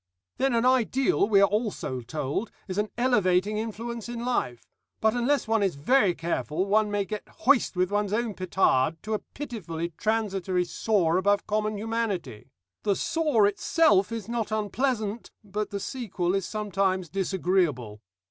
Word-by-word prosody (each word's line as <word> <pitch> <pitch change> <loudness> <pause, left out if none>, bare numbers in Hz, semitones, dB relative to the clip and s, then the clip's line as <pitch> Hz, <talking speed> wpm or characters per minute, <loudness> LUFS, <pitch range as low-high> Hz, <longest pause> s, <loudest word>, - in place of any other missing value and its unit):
"Then 270 -3 +1
an 230 +1 +2
ideal, 255 -3 +2
we 200 -2 +5
are 200 - +6
also 205 - -2
told, 150 - -3 0.2
is 185 +1 -2
an 210 0 0
elevating 210 -4 +2
influence 230 +1 -5
in 240 0 -4
life; 125 - -1 0.3
but 220 0 +3
unless 245 +2 +1
one 225 -1 +2
is 195 -6 +1
very 190 - +3
careful 170 +1 -2
one 210 +1 +2
may 205 -1 0
get 210 +1 -6
hoist 260 -5 +3
with 180 +1 +1
one's 205 -1 0
own 225 0 0
petard 170 -6 +1
to 220 - -3
a 215 - 0
pitifully 170 - -6
transitory 195 -5 0
soar 180 -4 +1
above 200 +2 +2
common 215 0 -1
humanity. 205 - -3 0.3
The 200 -2 +1
soar 300 - +2
itself 205 - +3
is 225 -3 -5
not 230 -2 -2
unpleasant, 220 +1 -1
but 210 +1 -3
the 200 - -4
sequel 190 -7 -2
is 195 -2 -1
sometimes 195 -4 -1
disagreeable. 175 - 0
205 Hz, 155 wpm, -27 LUFS, 185-230 Hz, 0.3 s, are